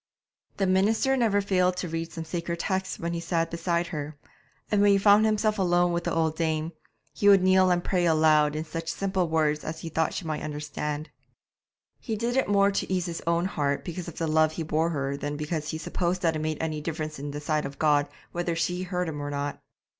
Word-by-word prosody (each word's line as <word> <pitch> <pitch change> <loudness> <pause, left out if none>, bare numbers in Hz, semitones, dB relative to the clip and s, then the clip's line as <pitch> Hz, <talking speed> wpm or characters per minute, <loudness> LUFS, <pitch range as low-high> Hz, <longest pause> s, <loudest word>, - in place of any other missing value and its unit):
The 195 - +1
minister 210 +8 +2
never 220 -5 +2
failed 185 -2 +1
to 180 - -2
read 165 0 -4
some 165 - -5
sacred 170 +1 -3
texts 190 +1 -2
when 170 0 -3
he 170 - -2
sat 165 -1 -1
beside 170 0 0
her; 150 -1 -5 0.5
and 205 -1 +3
when 205 0 +6
he - - +5
found 205 +2 +5
himself 215 0 +1
alone 175 -1 +3
with 170 0 -2
the - - 0
old 160 -1 +1
dame, 160 0 -1 0.4
he 205 - +3
would 195 -2 +6
kneel 185 0 +5
and 175 -1 +2
pray 180 -2 +1
aloud 155 -2 +4
in 155 +1 -3
such 165 0 -5
simple 190 -2 -1
words 155 -2 +1
as 155 - -5
he 165 - -5
thought 160 0 0
she 180 - -4
might 155 -1 -3
understand. 150 0 -4 0.9
He 225 - -3
did 235 +3 -1
it 265 - +1
more 200 0 +4
to 195 - -2
ease 180 -2 0
his 170 -2 -4
own 170 +1 +2
heart 145 -7 -1
because 175 0 -5
of 170 - -8
the 165 - -1
love 155 0 +3
he 165 - -3
bore 160 +1 +1
her 140 -3 -2
than 145 +1 -4
because 150 0 -3
he 160 - -3
supposed 180 +3 -2
that 165 -2 +2
it - - -2
made 155 0 -2
any 155 -2 -2
difference 155 -1 -4
in 145 +1 -5
the 145 +1 -5
sight 150 0 -1
of 140 0 -11
God 145 -1 +3 0.2
whether 175 -1 -2
she 175 +2 -1
heard 180 -1 -2
him 150 -2 -4
or 145 - -4
not. 145 0 -3
165 Hz, 230 wpm, -27 LUFS, 155-185 Hz, 0.9 s, when